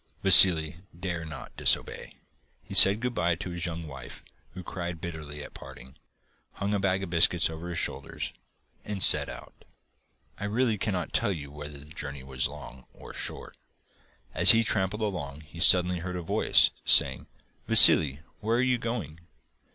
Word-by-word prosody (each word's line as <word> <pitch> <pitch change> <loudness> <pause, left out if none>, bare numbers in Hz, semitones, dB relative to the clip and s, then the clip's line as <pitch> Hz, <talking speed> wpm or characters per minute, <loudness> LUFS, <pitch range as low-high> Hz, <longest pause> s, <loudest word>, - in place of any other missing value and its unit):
Vassili 80 -3 +6 0.2
dared 85 -3 -6
not 80 - -12
disobey. - - -3 0.5
He - - -13
said 100 +3 +6
good 125 0 -4
bye 85 -4 -2
to 90 +1 -9
his 85 0 -5
young 85 -1 -8
wife, 70 -3 -13 0.3
who 90 - -10
cried 85 -1 -8
bitterly 75 -4 -9
at - - -14
parting, 65 +3 -14 0.6
hung 100 +1 -5
a 100 - -2
bag 95 0 -2
of 90 - -9
biscuits 85 -1 +1
over 80 +2 -10
his 85 - -7
shoulders, - - -6 0.5
and 100 -4 -2
set - - +4
out. - - -12 0.9
I 100 - -6
really 110 0 -2
cannot 90 -6 -5
tell - - -1
you 70 -6 -9
whether 75 0 -11
the 70 - -14
journey 70 -4 -9
was 65 0 -2
long 65 -3 -14
or - - -14
short. - - -9 0.8
As 90 +4 +6
he 115 0 +1
tramped 95 -2 -3
along 90 -10 -7
he 80 +2 -16
suddenly 90 0 +4
heard 90 +2 -8
a 90 - -7
voice - - +1
saying: - - +2 0.4
'Vassili! 75 -1 +7 0.2
where 115 +2 -2
are 125 - 0
you 125 -1 -1
going? 110 - -7
85 Hz, 165 wpm, -25 LUFS, 75-95 Hz, 0.9 s, Vassili